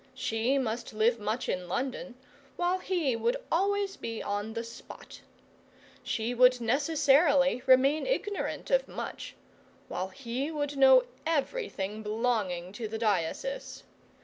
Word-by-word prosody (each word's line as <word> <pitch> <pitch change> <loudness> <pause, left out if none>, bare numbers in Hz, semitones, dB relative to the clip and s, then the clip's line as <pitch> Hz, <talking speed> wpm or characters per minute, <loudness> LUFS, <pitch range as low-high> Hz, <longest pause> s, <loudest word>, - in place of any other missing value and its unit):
She 245 +1 0
must 235 -3 -3
live 230 +2 +2
much 215 +4 -2
in 180 -1 -2
London, 255 +5 -3 0.4
while 355 +1 0
he 340 -10 0
would 475 - 0
always 395 +2 +1
be 230 -1 -5
on 205 +2 -3
the 230 0 -3
spot. 230 - -11 0.8
She 230 +2 -2
would 250 +1 +5
necessarily 280 +1 +3
remain 270 - +4
ignorant 415 -4 -2
of - - +3
much - - -7 0.5
while 185 +1 -3
he 245 +8 -4
would 290 -2 -3
know 265 -2 +7 0.2
everything 285 - -2
belonging 210 -5 -1
to 225 0 -5
the 220 +1 -4
diocese. 220 - -2
255 Hz, 125 wpm, -29 LUFS, 220-300 Hz, 0.8 s, know